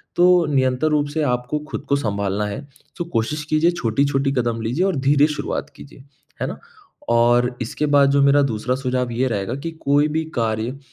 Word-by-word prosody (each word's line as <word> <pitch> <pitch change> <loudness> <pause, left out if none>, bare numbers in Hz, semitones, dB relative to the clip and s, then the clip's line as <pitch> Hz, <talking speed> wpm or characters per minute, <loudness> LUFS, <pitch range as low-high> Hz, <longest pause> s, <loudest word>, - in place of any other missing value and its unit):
तो 180 -1 +5
नियंतर 130 +2 +1
रूप 150 -1 +1
से 160 - -1
आपको 125 +4 -2
खुद - - -6
को 140 - +3
संभालना 100 -5 -1
है 135 +8 -6 0.3
तो 175 - -3
कोशिश 150 +7 -1
कीजिए 155 +3 +3
छोटी-छोटी 135 0 0
कदम 120 -4 -1
लीजिए 125 +11 0
और 195 -3 0
धीरे 140 +2 +3
शुरुआत 150 - -4
कीजिए। 135 -1 -14 0.4
है - - 0
ना? - - -6 0.5
और 120 +1 +3
इसके 120 +5 -2
बाद 140 -1 +5
जो 140 0 +3
मेरा 140 +1 +5
दूसरा 125 -1 -1
सुझाव 125 -2 -2
ये 125 +3 0
रहेगा 110 0 -2
कि 165 - -2
कोई 145 +2 +3
भी 160 +1 -1
कार्य, 115 +2 -1
135 Hz, 185 wpm, -21 LUFS, 120-145 Hz, 0.5 s, तो